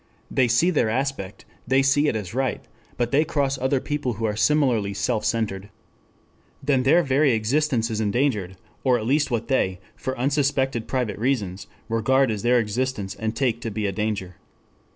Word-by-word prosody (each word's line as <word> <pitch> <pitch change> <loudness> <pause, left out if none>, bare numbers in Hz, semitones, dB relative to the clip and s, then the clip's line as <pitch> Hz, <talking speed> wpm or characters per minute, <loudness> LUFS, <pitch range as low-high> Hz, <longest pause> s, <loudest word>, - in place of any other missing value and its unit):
They 130 - +3
see 120 +10 +3
their 145 -9 +1
aspect. 125 -5 -3 0.2
They 135 +1 +3
see 145 +2 +3
it 125 - +1
as 100 -5 -4
right. 130 0 -1 0.3
But 120 -1 -1
they 145 +3 +4
cross 140 -3 -1
other 130 +1 +1
people 145 -3 -2
who 110 +1 -3
are 105 -1 -1
similarly 115 -6 +2
self 105 +3 -1
centered. 100 -4 -2 0.9
Then 135 -2 +2
their 160 +7 +4
very 140 -1 +3
existence 120 +1 +1
is 110 0 -1
endangered, 105 -4 0 0.3
or 125 -2 +3
at 110 - -4
least 145 +5 +2
what 115 -2 -2
they, 95 -9 0 0.2
for 130 0 -4
unsuspected 135 -2 0
private 120 -7 -2
reasons, 105 -7 -1 0.2
regard 130 +3 +2
as 105 -2 -3
their 120 +2 +3
existence 110 -3 -1
and 110 +2 -4
take 120 -3 0
to 115 - -3
be 105 0 -3
a 100 - 0
danger. 95 -4 -3
120 Hz, 175 wpm, -24 LUFS, 110-135 Hz, 0.9 s, they